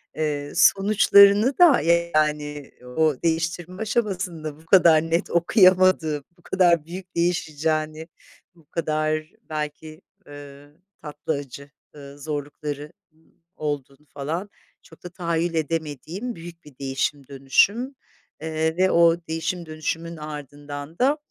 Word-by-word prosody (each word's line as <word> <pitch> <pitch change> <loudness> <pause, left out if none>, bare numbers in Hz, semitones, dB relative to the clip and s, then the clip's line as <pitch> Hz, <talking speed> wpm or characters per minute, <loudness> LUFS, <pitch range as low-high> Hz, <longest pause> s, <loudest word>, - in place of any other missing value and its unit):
eee, 145 -2 -2
sonuçlarını 200 +4 +5
da, 340 -8 +6 0.3
yani, 150 -2 -1
o 155 +4 +1
değiştirme 165 +3 -2
aşamasında 185 -9 -2
bu 160 - -20
kadar 165 -3 +6
net 165 +1 -1
okuyamadığım, 180 - +4
bu - - -24
kadar 175 -4 +2
büyük 180 +2 -9
değişeceğini, 155 -2 -1 0.5
bu 165 -2 -23
kadar 155 -1 -1 0.3
belki, 155 +1 -6 0.3
ııı, 145 0 -13 0.3
tatlı, 150 +1 -4
acı, 140 0 -8 0.2
ııı, 140 0 -12
zorlukları 145 +1 -5 0.2
ı 155 - -32 0.4
olduğunu, 145 -1 -5
falan, 160 +8 -4 0.3
çok 160 - -19
da 180 - -7
tahayyül 170 -1 -2
edemediğim 160 - -3
büyük 170 0 -11
bir 145 -4 -16
değişim 135 0 -2
dönüşüm. 200 - +1 0.5
Eee, 160 +1 -1
ve 185 0 +3
o 170 0 +5
değişim 165 +2 -3
dönüşümün 165 +1 -4
ardından 145 0 -8
da, 275 +4 +3
160 Hz, 115 wpm, -23 LUFS, 145-175 Hz, 0.5 s, da